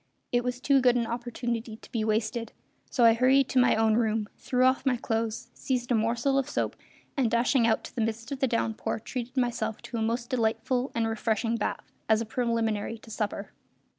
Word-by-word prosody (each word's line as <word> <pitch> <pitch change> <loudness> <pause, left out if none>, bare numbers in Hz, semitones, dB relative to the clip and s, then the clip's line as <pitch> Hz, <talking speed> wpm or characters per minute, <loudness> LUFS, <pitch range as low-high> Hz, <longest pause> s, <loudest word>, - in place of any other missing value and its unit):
It 245 0 +2
was 250 0 -2
too 275 +1 +3
good 250 -1 +4
an 240 -1 +1
opportunity 235 -1 -3
to - - -16
be 225 -2 -1
wasted, 225 +2 -1 0.4
so 245 -3 +3
I 230 - +8
hurried 260 +3 +4
to 260 - +3
my 250 - +5
own 220 0 +3
room, 220 -2 0
threw 250 0 +1
off 260 +1 +3
my 260 -2 +2
clothes, 230 +1 -2
seized 250 -2 -2
a - - +5
morsel 235 +5 +2
of 270 - -2
soap, - - -1 0.4
and, 260 -5 +2
dashing 235 +1 +3
out 220 - +2
to - - -9
the 235 - -1
midst 225 +3 -2
of 275 - -3
the 265 - +2
downpour, 230 -2 -1
treated 250 +3 -6
myself 235 -3 0
to 235 - -5
a - - -1
most 235 +3 -1
delightful 245 +2 0
and 230 -1 +1
refreshing 225 +1 0
bath, 225 - -3 0.2
as 220 -1 +5
a 230 - -2
preliminary 225 -2 -1
to 225 0 -14
supper. 205 -2 -3
235 Hz, 205 wpm, -28 LUFS, 225-250 Hz, 0.4 s, I